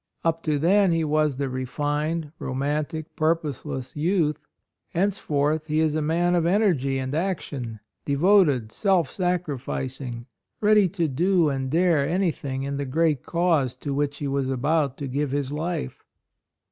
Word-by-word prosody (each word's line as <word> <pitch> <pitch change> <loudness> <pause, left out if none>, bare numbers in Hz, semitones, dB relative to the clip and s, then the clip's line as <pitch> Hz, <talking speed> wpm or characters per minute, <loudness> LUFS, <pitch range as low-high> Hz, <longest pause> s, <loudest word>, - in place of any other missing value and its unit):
Up 165 0 +1
to 155 -2 0
then 190 +5 +4
he 165 -1 +1
was 150 -2 +1
the 140 0 -1
refined, 145 +4 -2
romantic, 150 +4 -3
pur 160 +1 +3
poseless 135 -4 -6
youth; 155 -1 +1 0.6
henceforth 155 -5 0
he 155 0 +1
is 160 -1 +2
a 155 - 0
man 170 +3 +1
of 175 -2 +2
energy 170 -9 +2
and 130 +1 -3
action 145 - -3
— - - -60
devoted, 145 - +3
self 185 - +1
sacrificing, 135 -8 -3 0.3
ready 210 -2 +4
to 170 -2 -1
do 170 +3 +2
and 135 -1 -2
dare 160 -2 +2
anything 155 -7 -1
in 140 0 -3
the 140 - -2
great 150 0 +1
cause 165 -7 +1
to 145 - -4
which 145 0 -1
he 145 - -3
was 135 -1 -1
about 140 +1 0
to 140 - -4
give 140 +2 -1
his 140 0 -2
life. 155 - -3
150 Hz, 155 wpm, -25 LUFS, 140-170 Hz, 0.6 s, then